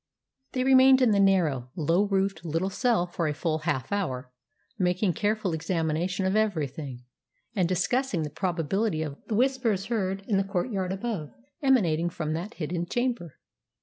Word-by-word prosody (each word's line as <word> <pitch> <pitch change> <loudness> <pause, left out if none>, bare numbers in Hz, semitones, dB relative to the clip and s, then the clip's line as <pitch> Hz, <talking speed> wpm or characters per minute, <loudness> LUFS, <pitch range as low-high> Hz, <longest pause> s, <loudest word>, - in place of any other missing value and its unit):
They 255 - 0
remained 265 0 +7
in 250 -4 +4
the 200 - +3
narrow, 165 -11 +2
low 170 +4 +2
roofed 195 -3 0
little 170 +4 -1
cell 230 -4 +2
for 175 -2 -2
a 150 - -1
full 160 0 -1
half 130 +1 -2
hour, 130 -11 -2 0.5
making 180 +1 +1
careful 210 -3 0
examination 165 +3 -1
of 190 +2 +1
everything, 150 - -1 0.5
and 180 -4 +2
discussing 185 +1 0
the 150 - -4
probability 180 +1 -1
of 145 -2 -6
the 215 - -1
Whispers 240 -5 +1
heard 195 -2 -1
in 205 - +2
the 195 - +2
courtyard 190 0 -2
above 195 -6 -3 0.3
emanating 175 - +3
from 155 -2 -3
that 180 +8 -5
hidden 175 +1 -3
chamber. 240 - -2
185 Hz, 155 wpm, -27 LUFS, 160-210 Hz, 0.5 s, remained